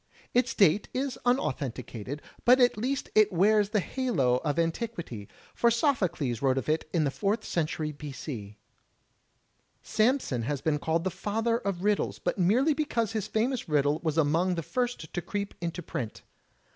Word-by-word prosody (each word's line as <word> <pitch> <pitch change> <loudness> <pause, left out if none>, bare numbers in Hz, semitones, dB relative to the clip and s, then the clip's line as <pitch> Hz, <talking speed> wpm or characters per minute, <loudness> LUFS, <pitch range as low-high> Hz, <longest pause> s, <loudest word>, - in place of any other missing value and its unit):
Its 245 0 +2
date 195 +1 +4
is 265 0 -2
imauthenticated, 140 - -2 0.2
but 250 +2 +6
at 245 -1 +5
least 255 +6 -2
it 215 -1 +5
wears 205 +3 +3
the 210 0 +2
halo 175 - +1
of 145 +3 -2
antiquity, 165 - -2 0.3
for 235 - +3
Sophocles 195 - 0
wrote 135 -1 +2
of 130 - -2
it 155 0 0
in 165 -3 +2
the 140 - +1
Fourth 210 +7 -1
Century 155 -2 -1
b. 150 0 -8
c. 110 -7 -7 1.3
Samson 220 - +1
has 140 +4 -2
been 150 +1 0
called 160 +2 0
the 190 - -1
Father 225 +4 -1
of 195 -4 -3
Riddles, 210 0 +1
but - - -2
merely 245 - +4
because 240 -8 -1
his 215 -2 -2
famous 230 -1 -1
riddle 145 0 +2
was 160 -1 -1
among 165 +4 +2
the 165 - -3
first 245 -6 -3
to 175 - -2
creep 200 +2 -4
into 170 +1 -3
print. 115 -7 -5
180 Hz, 165 wpm, -28 LUFS, 150-230 Hz, 1.3 s, but